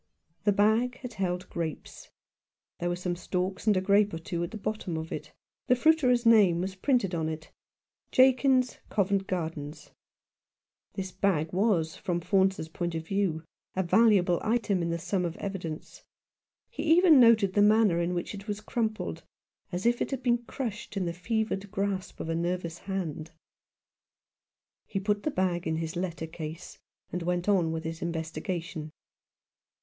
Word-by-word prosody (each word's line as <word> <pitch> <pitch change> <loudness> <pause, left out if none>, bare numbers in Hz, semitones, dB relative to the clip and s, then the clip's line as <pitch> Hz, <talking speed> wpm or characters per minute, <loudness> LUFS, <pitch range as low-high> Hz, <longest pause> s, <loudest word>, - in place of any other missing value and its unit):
The 205 - +5
bag 220 +5 +2
had 250 -3 -7
held 185 -2 -2
grapes. 165 -2 -5 0.7
There 175 - -1
were 175 - 0
some 180 0 -2
stalks 185 +3 -3
and 210 -3 +5
a - - +2
grape 200 0 +3
or - - -3
two 170 +1 -3
at 170 - -3
the 220 - -7
bottom 205 -5 -3
of 160 0 -5
it. - - -6 0.4
The 250 - +5
fruiterer's 255 -4 +3
name 205 -7 +6
was 190 +2 -2
printed 195 -2 +1
on 160 -2 -1
it, 155 0 -7 0.6
"Jakins, 255 -1 +4
Covent 195 -1 +1
Garden." 160 -5 -3 1.2
This 190 -2 -4
bag 180 -4 0
was, 180 -5 +1
from 175 -1 -2
Faunce's 190 -1 +1
point 170 +1 -3
of 160 0 -4
view, 180 -4 -1 0.3
a 190 - +1
valuable 190 -3 +4
item 215 -4 +1
in 170 - -1
the 170 - -1
sum 180 +3 -1
of 170 -1 -2
evi 195 -1 -4
dence. 160 -3 -8 0.7
He - - -5
even 330 -2 +6
noted 225 -5 +6
the 205 - +3
manner 210 -4 +4
in 175 +1 -1
which 175 - -3
it 200 0 -9
was 205 -1 -3
crumpled, 220 0 -2 0.5
as 180 +3 -3
if 240 0 +2
it - - 0
had 265 -2 -4
been 240 -1 +3
crushed 230 -4 -5
in 190 - 0
the 170 - -2
fevered 205 +1 -2
grasp 195 -1 -3
of - - -4
a 165 - -1
nervous 170 0 -2
hand. 165 -5 -4 1.5
He 195 - -2
put 205 +1 0
the 305 - -1
bag 180 - -1
in 160 - 0
his 160 +1 -3
letter 175 -2 -3
case, 160 +1 -8 0.3
and 180 - -3
went 175 +1 -1
on 180 -6 +3
with 160 0 -3
his 165 0 -5
investiga 165 +2 -3
tion. 155 -3 -7
190 Hz, 170 wpm, -28 LUFS, 170-215 Hz, 1.5 s, name